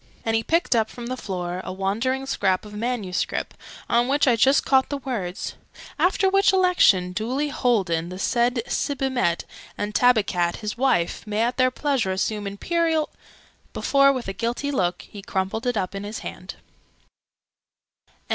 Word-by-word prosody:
And 225 0 +1
he 225 - +2
picked 330 +1 +1
up 220 -1 +2
from 240 - -8
the 255 +2 -3
floor 180 -5 -4
a - - -5
wandering 225 +8 -1
scrap 200 -8 0
of 210 - -11
manuscript, 215 -4 -2 0.3
on 240 +1 +2
which 285 +1 +2
I 245 - +5
just 270 +5 +4
caught 265 -1 +3
the 285 - -2
words 225 -10 -4 0.5
'after 385 +1 +3
which 390 0 +4
Election 360 - +4
duly 255 +10 -2
holden 190 - 0
the 185 - -7
said 235 +3 +1
Sibimet 260 -13 -1 0.3
and 205 0 -3
Tabikat 200 -8 +2
his 210 -1 -5
wife 240 -7 0
may 210 +1 0
at 240 +2 -1
their 255 0 +4
pleasure 255 -6 -1
assume 205 +2 -2
Imperial 320 - 0 0.3
' - - -33
before, 275 0 +4
with 255 -5 -4
a 195 - -3
guilty 240 +6 -2
look, 180 -9 -1
he 205 - -11
crumpled 195 +5 -2
it 245 -2 0
up 185 -2 -2
in 195 0 -5
his 210 +2 -5
hand. - - -7
230 Hz, 165 wpm, -24 LUFS, 195-265 Hz, 0.5 s, I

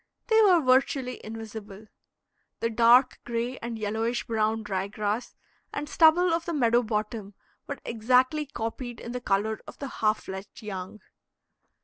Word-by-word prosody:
They 445 0 +6
were 370 -5 +6
virtually 255 0 +2
invisible. 220 -2 -8 0.7
The 230 - -1
dark 240 +3 +5
gray 240 +2 -3
and 235 -1 -5
yellowish 220 +3 -1
brown 220 -1 0
dry 195 -2 -2
grass 210 +3 -3 0.4
and 290 +1 -4
stubble 330 +3 +5
of 335 0 -1
the 340 - -3
meadow 240 -3 +3
bottom 210 -2 -3 0.3
were 285 - -4
exactly 255 +6 +2
copied 240 -1 -5
in 235 - -7
the 250 0 -4
color 215 0 0
of - - -10
the 280 - -5
half 215 0 +2
fledged 190 +4 -8
young. 195 0 -6
230 Hz, 145 wpm, -27 LUFS, 215-255 Hz, 0.7 s, They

